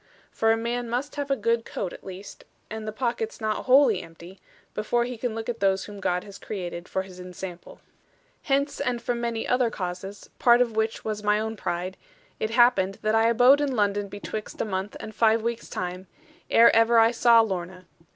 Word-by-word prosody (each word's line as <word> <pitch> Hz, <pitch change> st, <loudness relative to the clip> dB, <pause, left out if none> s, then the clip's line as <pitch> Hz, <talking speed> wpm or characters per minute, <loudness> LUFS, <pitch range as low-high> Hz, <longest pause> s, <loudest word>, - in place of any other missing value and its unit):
For 225 Hz, 0 st, +2 dB
a 225 Hz, -, +3 dB
man 235 Hz, +1 st, -3 dB
must 255 Hz, +5 st, -3 dB
have 285 Hz, -1 st, -3 dB
a 275 Hz, -, +3 dB
good 230 Hz, -2 st, 0 dB
coat 185 Hz, -5 st, -5 dB
at -, -, -12 dB
least, 190 Hz, +1 st, -10 dB, 0.3 s
and 220 Hz, 0 st, -5 dB
the -, -, -2 dB
pockets 250 Hz, -, -3 dB
not 215 Hz, -1 st, -2 dB
wholly 255 Hz, -7 st, +5 dB
empty, 170 Hz, +3 st, -13 dB, 0.3 s
before 235 Hz, +3 st, 0 dB
he 250 Hz, +1 st, -4 dB
can 230 Hz, -1 st, -3 dB
look 225 Hz, 0 st, -5 dB
at 235 Hz, -1 st, -3 dB
those 195 Hz, -1 st, +2 dB
whom 205 Hz, -1 st, -9 dB
God 180 Hz, -2 st, -1 dB
has 200 Hz, -1 st, -11 dB
created 175 Hz, -3 st, -6 dB
for 190 Hz, -, -1 dB
his 185 Hz, -1 st, -13 dB
ensample. 180 Hz, 0 st, -9 dB, 0.6 s
Hence, 280 Hz, +1 st, 0 dB
and 245 Hz, -1 st, -1 dB
from 235 Hz, 0 st, -2 dB
many 235 Hz, -1 st, -2 dB
other 250 Hz, -1 st, +2 dB
causes 190 Hz, 0 st, -6 dB
part 240 Hz, -1 st, +6 dB
of 235 Hz, -3 st, +1 dB
which 220 Hz, 0 st, -1 dB
was 215 Hz, -1 st, -3 dB
my 210 Hz, 0 st, +2 dB
own 220 Hz, +1 st, -3 dB
pride 185 Hz, -1 st, -4 dB, 0.4 s
it 215 Hz, -, -1 dB
happened 225 Hz, -5 st, +3 dB
that 215 Hz, 0 st, +1 dB
I 225 Hz, +1 st, +4 dB
abode 250 Hz, +5 st, +5 dB
in 275 Hz, -3 st, 0 dB
London 205 Hz, -1 st, +1 dB
betwixt 205 Hz, +2 st, -7 dB
a -, -, 0 dB
month 195 Hz, 0 st, -3 dB
and 220 Hz, -, -8 dB
five 220 Hz, 0 st, +3 dB
weeks' 235 Hz, 0 st, -3 dB
time, 180 Hz, +1 st, -5 dB, 0.4 s
ere 230 Hz, +1 st, +6 dB
ever 230 Hz, +1 st, +5 dB
I 225 Hz, 0 st, +6 dB
saw 235 Hz, -1 st, +5 dB
Lorna. 185 Hz, -3 st, -4 dB
220 Hz, 200 wpm, -26 LUFS, 195-235 Hz, 0.6 s, part